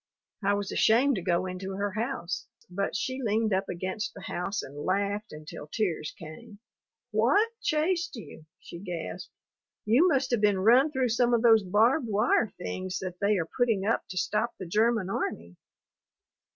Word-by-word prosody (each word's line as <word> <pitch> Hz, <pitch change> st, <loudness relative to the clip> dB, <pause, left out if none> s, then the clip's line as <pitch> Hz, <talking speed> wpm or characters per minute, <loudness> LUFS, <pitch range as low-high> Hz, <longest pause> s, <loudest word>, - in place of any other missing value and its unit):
I 200 Hz, +1 st, +3 dB
was 200 Hz, -1 st, -3 dB
ashamed 250 Hz, +6 st, +4 dB
to -, -, -3 dB
go 175 Hz, +1 st, +1 dB
into 185 Hz, +1 st, -5 dB
her 200 Hz, +1 st, -2 dB
house, 220 Hz, -4 st, -3 dB, 0.2 s
but 200 Hz, +2 st, -2 dB
she 270 Hz, -3 st, -2 dB
leaned 220 Hz, -2 st, +1 dB
up 190 Hz, +1 st, 0 dB
against 185 Hz, +4 st, -4 dB
the 200 Hz, -, -10 dB
house 195 Hz, +3 st, -3 dB
and 145 Hz, +2 st, -9 dB
laughed 200 Hz, +2 st, -1 dB
until 150 Hz, -1 st, -9 dB
tears 165 Hz, -4 st, -2 dB
came. 160 Hz, +6 st, -11 dB, 0.5 s
"What 255 Hz, -, +3 dB
chased 330 Hz, +1 st, 0 dB
you?" 180 Hz, -8 st, -11 dB
she 170 Hz, -, -10 dB
gasped. 175 Hz, -3 st, -6 dB, 0.5 s
"You 245 Hz, +12 st, +5 dB
must 270 Hz, -6 st, +1 dB
have 240 Hz, -3 st, +1 dB
been 205 Hz, -2 st, +3 dB
run 245 Hz, +10 st, +5 dB
through 260 Hz, -3 st, 0 dB
some 240 Hz, +1 st, +3 dB
of 230 Hz, -, 0 dB
those 225 Hz, -2 st, +7 dB
barbed 225 Hz, -, +2 dB
wire 215 Hz, +2 st, +2 dB
things 185 Hz, +1 st, -4 dB
that 180 Hz, -2 st, -6 dB
they 205 Hz, 0 st, +3 dB
are 165 Hz, -, -1 dB
putting 225 Hz, -6 st, +1 dB
up 225 Hz, -, +1 dB
to 185 Hz, -, -7 dB
stop 215 Hz, +5 st, 0 dB
the 190 Hz, -, -6 dB
German 215 Hz, +2 st, +2 dB
army." 85 Hz, -, -3 dB
205 Hz, 170 wpm, -28 LUFS, 185-235 Hz, 0.5 s, those